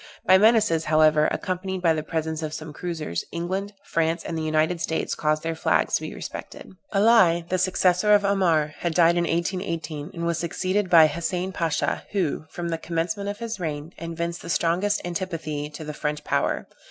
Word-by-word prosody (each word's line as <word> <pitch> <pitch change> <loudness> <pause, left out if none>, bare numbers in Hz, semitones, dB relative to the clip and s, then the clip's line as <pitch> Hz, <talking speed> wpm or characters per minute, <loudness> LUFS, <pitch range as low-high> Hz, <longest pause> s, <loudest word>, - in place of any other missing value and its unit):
By 190 - +6
menaces, 215 -7 +4
however, 155 0 +4
accompanied 185 0 -3
by 165 -2 +4
the 155 - -2
presence 160 0 -3
of 155 -1 -4
some 155 -1 -7
cruisers, 160 - -4
England, 190 +4 -3
France, 165 0 0
and 165 - -4
the 160 - -2
United 155 +2 +1
States 160 - -1
caused 155 0 0
their 165 0 -1
flags 160 - +1
to - - +2
be - - -6
respected. - - -8 0.2
Ali, 195 -5 +4
the 185 - 0
successor 185 +2 +3
of 205 - +2
Amar, 170 -7 +2
had 170 -2 -2
died 170 -1 +5
in 175 0 +1
1818, 165 -3 -2
and 170 0 -3
was 170 -1 0
succeeded 185 +3 -1
by 165 -3 +8
Hassein 175 +3 -2
Pasha, 165 -4 -1
who, 175 -6 -1
from 170 -1 -5
the 165 -1 -2
commencement 175 +5 -2
of 205 - -4
his 230 -2 -5
reign, 155 0 -4
evinced 170 +1 -4
the - - -9
strongest 175 +6 +1
antipathy 165 -5 -4
to 150 +1 -9
the 150 0 -6
French 150 0 -3
power. - - 0
170 Hz, 185 wpm, -24 LUFS, 155-185 Hz, 0.2 s, by